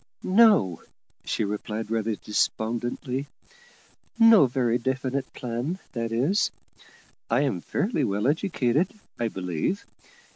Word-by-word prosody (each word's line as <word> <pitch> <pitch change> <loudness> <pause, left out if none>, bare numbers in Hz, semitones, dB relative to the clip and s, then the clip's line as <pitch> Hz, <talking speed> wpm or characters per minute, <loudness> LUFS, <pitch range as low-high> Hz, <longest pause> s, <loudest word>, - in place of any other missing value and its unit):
"No," 190 - +4 0.4
she - - -1
replied 105 +1 -4
rather 110 -1 0
despondently: 120 +6 -2 0.9
"no 225 - +7
very 125 -1 +1
definite 130 +1 -2
plan, 125 +8 -3 0.2
that 115 -2 -3
is. 155 - +2 0.8
I 120 +4 +3
am 130 -12 0
fairly 195 - -1
well 105 -2 -1
educated, 150 - +1 0.3
I 120 - +1
believe. 90 - -2
125 Hz, 105 wpm, -26 LUFS, 110-145 Hz, 0.9 s, no